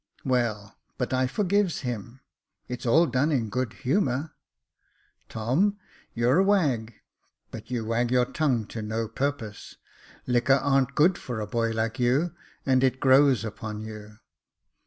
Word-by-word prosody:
Well, 115 -6 -1 0.2
but - - -2
I 130 0 +2
forgives 200 +3 0
him; 120 0 -6 0.5
it's 125 0 -5
all 160 +8 +5
done 140 +2 +1
in 120 -7 0
good 125 +1 -2
humour." 140 0 -1 1.0
Tom, 145 - +1 0.4
you're 120 +7 +3
a - - +5
wag, 140 - +1 0.6
but - - -9
you 120 -3 -2
wag 115 +2 0
your 125 0 +3
tongue 125 -6 0
to 110 - -5
no 110 +1 -2
purpose. 120 -2 -4 0.5
Liquor 125 +2 +3
ar'n't 135 -1 +2
good 170 +5 +4
for 120 -3 -5
a 105 - -2
boy 115 +2 -1
like 115 +2 -2
you, 135 +8 +2 0.3
and 130 -1 +3
it 130 0 +2
grows 130 -4 +4
upon 110 0 -6
you." 110 -1 -9
125 Hz, 145 wpm, -26 LUFS, 115-140 Hz, 1.0 s, all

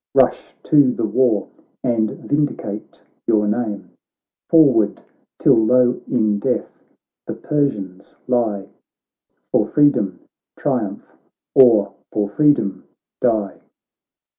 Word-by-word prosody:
Rush - - +1
to 145 -4 +4
the - - -2
war, 110 -1 +1 0.4
and 115 -4 +1
vindicate 145 -9 -4 0.2
your 105 -1 +2
name; 105 -4 -3 0.6
Forward! 130 -11 +4 0.4
tilUowin 115 -2 +2
death - - -3 0.5
the - - -4
Persianslie, 105 -4 -2 0.8
For 105 - +2
freedom 145 -10 +2 0.4
triumph - - -3 0.5
or 110 -6 +5 0.2
for 105 -1 -1
freedom 145 -5 +1 0.4
die.' 110 -5 0
110 Hz, 85 wpm, -19 LUFS, 105-130 Hz, 0.8 s, or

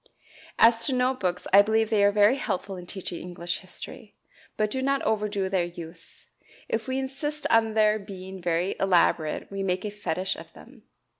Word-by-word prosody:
As 230 0 +5
to 270 - 0
note 255 +1 +1
books, 180 -1 -2
I 200 - +10
believe 220 +1 +1
they 210 -2 +4
are 200 - +5
very 210 +5 +4
helpful 195 -5 -3
in 180 -1 -9
teaching 180 -3 -6
English 175 -1 -4
history; 190 +3 -11 0.4
but 215 -1 +1
do 260 - -2
not 275 +1 +1
overdo 210 -2 0
their 190 -2 +1
use. 170 -1 -11 0.4
If 225 -1 -2
we 260 0 -1
insist 275 +3 -4
on 225 -1 +3
their 215 0 +4
being 190 -2 -9
very 175 +2 0
elaborate 175 -4 +2
we 195 0 -4
make 185 0 -1
a 210 - -3
fetish 190 -2 -2
of - - -12
them. - - -16
205 Hz, 180 wpm, -26 LUFS, 185-225 Hz, 0.4 s, I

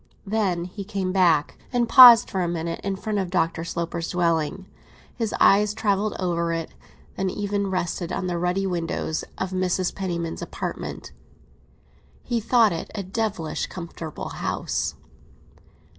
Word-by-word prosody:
Then 195 -5 0
he 195 +3 -7
came 195 -2 -3
back, 170 -6 +2
and 240 -2 +1
paused 240 -3 +10
for 190 - -1
a 175 - 0
minute 170 0 -3
in 195 0 -1
front 210 +1 -2
of 190 -2 -2
Dr. 165 -2 0
Sloper's 170 0 -3
dwelling. 170 +1 0 0.5
His 225 -3 -2
eyes 210 +1 +5
travelled 205 -1 0
over 170 -2 -1
it; 165 -1 -3 0.5
they 195 - -1
even 200 +1 -1
rested 175 -2 -2
on 195 - -2
the 175 -1 -2
ruddy 180 +3 0
windows 165 -3 -2
of 190 - -3
Mrs. 185 -1 0
Penniman's 170 -4 -3
apartment. - - -6 1.1
He 240 -2 -1
thought 230 0 +4
it 165 - -5
a 200 - -3
devilish 195 -4 -2
comfortable 170 -3 -7
house. - - -2
185 Hz, 145 wpm, -24 LUFS, 170-205 Hz, 1.1 s, paused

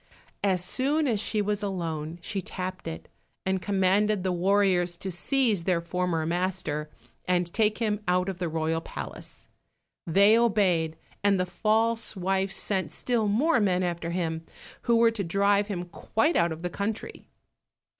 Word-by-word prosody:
As 185 -3 +1
soon 290 +9 +1
as 225 -5 +1
she 210 0 0
was 205 0 -1
alone 165 -5 -3
she 195 +1 -3
tapped 185 0 -6
it, 80 0 -6 0.4
and 190 0 0
commanded 200 +1 +2
the 185 - 0
warriors 180 -1 +2
to 190 - -5
seize 215 0 +1
their 180 -3 +2
former 170 -1 -1
master, 170 -3 -2 0.4
and 180 -1 0
take 215 -1 +2
him 215 -3 0
out 180 +1 +2
of 190 -2 -4
the 175 -2 -1
royal 160 0 -1
palace. - - -8 0.6
They 200 +6 +6
obeyed, 190 -9 +2 0.3
and 200 -2 +3
the 180 - +1
false 225 +4 +1
wife 190 +1 0
sent 190 -1 -1
still 235 -4 0
more 245 +7 +3
men 185 -3 +2
after 170 -1 -2
him, 165 -2 -2 0.4
who 235 - +2
were 230 0 +5
to 220 -3 -3
drive 200 +3 +2
him 180 -4 -3
quite 225 - 0
out 170 0 +3
of 160 +1 -6
the 180 - -2
country. 205 +4 -4
190 Hz, 160 wpm, -27 LUFS, 175-210 Hz, 0.6 s, They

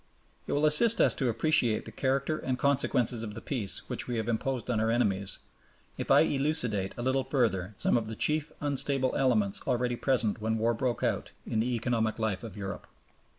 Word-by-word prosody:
It - - -2
will 145 +2 +2
assist 225 +10 +6
us - - +4
to 130 -3 -1
appreciate 120 -2 +2
the - - -9
character 140 +3 -1
and 130 -1 -2
consequences 125 -4 +1
of 105 -2 -6
the - - -6
Peace 105 -7 -2
which - - -4
we 120 -2 -2
have 110 0 -3
imposed 125 +1 -2
on 110 - 0
our 110 +1 +1
enemies, 100 -5 0 0.6
if - - -6
I - - +6
elucidate 125 -9 0
a 120 - -4
little 130 +1 +1
further 110 -8 -1
some - - +1
of 110 -2 -3
the 110 - -6
chief 150 +5 0
unstable 140 -2 +1
elements 110 -7 +2
already 125 -1 0
present 120 -4 0
when 110 +1 -1
war 115 +2 +1
broke 120 +1 -2
out, - - -1 0.2
in 110 - -2
the 120 +2 0
economic 115 -1 -1
life 110 -3 -2
of 110 -3 -8
Europe. 100 -1 -6
120 Hz, 195 wpm, -29 LUFS, 110-135 Hz, 0.6 s, assist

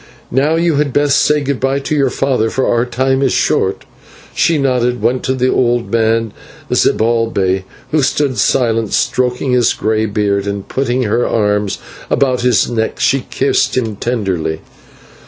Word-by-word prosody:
"Now 145 +5 +2
you 165 -2 +1
had 145 -3 0
best 145 -1 +3
say 150 0 +2
good 140 -2 -2
bye 135 +1 0
to 155 - -3
your 140 -3 +2
father, 125 -4 0
for 130 +3 -1
our 120 +1 +1
time 130 +2 0
is 135 -2 +1
short." - - 0 0.5
She 165 - +2
nodded, 125 -3 0
went 125 +1 0
to 130 - 0
the 130 0 +1
old 120 -1 0
man, 115 -1 +1 0.4
Zibalbay, 110 -5 +1 0.3
who 155 -1 +2
stood 135 -3 0
silent, 115 0 +1
stroking 125 +1 0
his 125 -2 +3
grey 110 0 -1
beard, 100 -1 -1
and, 100 -1 -4
putting 130 -1 -1
her 120 +2 0
arms 105 -2 0 0.3
about 130 -3 +1
his 125 -2 +2
neck, 110 -2 -2
she 135 -2 +1
kissed 135 -1 0
him 110 -4 -1
tenderly. 95 -9 -2
125 Hz, 160 wpm, -15 LUFS, 110-135 Hz, 0.5 s, best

